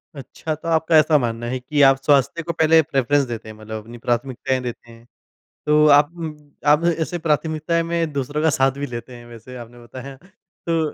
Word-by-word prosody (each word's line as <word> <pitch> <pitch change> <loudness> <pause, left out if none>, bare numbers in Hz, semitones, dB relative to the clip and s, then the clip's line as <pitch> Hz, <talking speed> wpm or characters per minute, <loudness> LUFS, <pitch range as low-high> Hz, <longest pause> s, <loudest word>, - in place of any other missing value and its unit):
अच्छा 140 +4 -6
तो 165 +2 -10
आपका 160 0 +3
ऐसा 155 0 +5
मानना 120 -2 -3
है 130 +1 -3
कि 145 +3 -1
आप 135 -1 +6
स्वास्थ्य 145 +3 +2
को 170 +1 -3
पहले 160 0 +4
प्रेफ़रेंस 140 -1 +1
देते 115 -2 -7
हैं, 110 - -10
मतलब 110 0 -8
अपनी 120 +2 -11
प्राथमिकताएँ 125 +2 -2
देते 120 -1 -7
हैं। 115 +1 -17 0.6
तो 150 0 +4
आप 145 +1 +5
उम, 160 -2 -6 0.3
आप 150 +3 +4
ऐसे 175 +2 -2
प्राथमिकताएँ 160 +1 0
में 165 -2 -2
दूसरों 145 +2 -3
का 160 - +3
साथ 135 -1 +2
भी 145 - -3
लेते 125 0 -8
हैं 120 0 -13
वैसे 120 +2 -12
आपने 120 0 -11
बताया। 130 +3 -10 0.5
तो 165 -1 +1
140 Hz, 200 wpm, -21 LUFS, 120-155 Hz, 0.6 s, आप